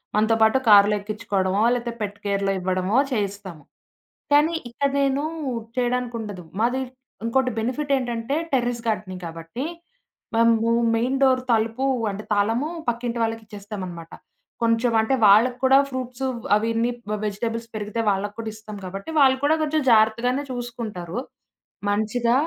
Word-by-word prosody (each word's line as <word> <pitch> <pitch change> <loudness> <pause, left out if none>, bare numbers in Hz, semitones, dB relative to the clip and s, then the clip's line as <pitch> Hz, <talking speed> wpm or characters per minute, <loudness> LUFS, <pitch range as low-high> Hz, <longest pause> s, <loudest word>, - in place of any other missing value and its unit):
మనతో 220 +2 +3
పాటు 220 +4 +5
కార్లో 205 0 +7
ఎక్కించుకోవడమో 205 -1 -1
లేపోతే, 240 -1 -3
పెట్ 205 -1 -3
కేర్‌లో 200 -1 0
ఇవ్వడమో 185 +4 0
చేయిస్తాము. 200 - -3 0.7
కానీ, 300 +3 +5 0.2
ఇక్కడా 275 +3 -1
నేను 275 +1 +1 0.5
చేయడానికుండదు. 235 -6 -2 0.2
మాది 250 +3 +1 0.4
ఇంకోటి 255 +2 +1
బెనిఫిటేంటంటే 255 0 -1 0.2
టెర్రస్ 245 -2 0
గార్డెనింగ్. 185 -4 -3
కాబట్టి, 165 - -6 0.7
మేము 230 0 +3 0.3
మెయిన్ 250 +4 0
డోర్ 260 -1 +4
తలుపు 225 +4 0 0.3
అంటే, 205 +2 -6
తాళము 225 +8 +1 0.2
పక్కింటి 235 0 -2
వాళ్ళకిచ్చేస్తామనమాట. 205 -6 -6 0.5
కొంచెం 230 +1 +2
అంటే, 220 +5 +1
వాళ్ళకి 230 +5 +5
కూడా 265 +1 +7
ఫ్రూట్సు 255 0 -4 0.3
అవన్నీ 230 +2 0 0.4
వెజిటబుల్స్ 230 +3 -4
పెరిగితే 215 +2 -3
వాళ్ళకి 205 +1 -2
కూడా 225 -1 -3
ఇస్తాం 215 -1 -9
కాబట్టి, 195 - -7
వాళ్ళు 265 -1 +5
కూడా 315 +2 +3
కొంచెం 310 0 0
జాగ్రత్తగానే 230 +5 +3
చూసుకుంటారు. 230 -6 -5 0.7
మంచిగా 220 +3 +1
230 Hz, 120 wpm, -23 LUFS, 205-250 Hz, 0.7 s, కార్లో